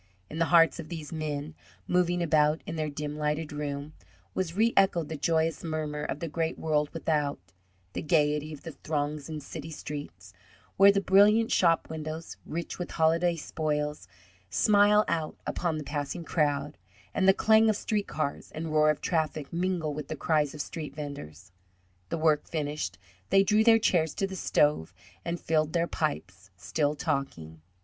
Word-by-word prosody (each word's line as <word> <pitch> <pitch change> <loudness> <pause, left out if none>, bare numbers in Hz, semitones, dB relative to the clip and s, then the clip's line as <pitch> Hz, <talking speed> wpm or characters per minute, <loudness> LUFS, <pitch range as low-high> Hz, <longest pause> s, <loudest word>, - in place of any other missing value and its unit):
In 160 - -5
the 165 - +3
hearts 165 0 +5
of 160 - -7
these 160 -3 -6
men, 155 -1 -4 0.3
moving 175 -1 +2
about 155 -1 +2
in - - -5
their 155 -1 -2
dim 150 +1 -5
lighted 150 +1 -1
room, 145 0 -4 0.4
was 180 -3 -2
reechoed 195 -7 +3
the 160 - -3
joyous 160 +2 0
murmur 155 -2 -3
of 150 - -3
the 170 - -2
great 165 +1 -2
world 150 -2 0
without: 150 -3 -1 0.6
the - - -3
gayety 150 -1 +1
of 150 - -9
the 165 - -6
throngs 150 -1 -3
in 155 -1 -4
city 155 +2 -8
streets, 145 - -8 0.4
where 200 +1 +8
the 200 0 +1
brilliant 210 +4 +5
shop 165 -2 +3
windows, 160 +1 -6
rich 170 +2 -5
with 175 - -4
holiday 165 +2 +2
spoils, 150 - -3 0.4
smile 210 - +4
out 160 -2 -2
upon 170 -3 -1
the 155 - -4
passing 145 +4 -4
crowd, 150 -4 -1 0.3
and 190 - +2
the - - +9
clang 220 +3 +4
of 215 - +2
street 210 0 -2
cars 150 -2 -3
and 160 0 -4
roar 155 0 +5
of 150 - 0
traffic 155 -3 -1
mingle 170 -3 -1
with 145 -1 -6
the 155 - -4
cries 150 -2 +1
of 150 - -3
street 150 -2 -6
venders. 95 - -8 0.6
The 170 - -2
work 155 -2 +2
finished, 145 - -3 0.3
they 195 0 +5
drew 210 +2 +3
their 225 0 +7
chairs 165 -8 +1
to 195 - 0
the 195 0 -6
stove, 145 - +1 0.3
and 170 0 -3
filled 155 -1 0
their 170 0 +2
pipes, 95 - -4
still 145 - -1
talking. 135 - -3
155 Hz, 170 wpm, -28 LUFS, 150-170 Hz, 0.6 s, the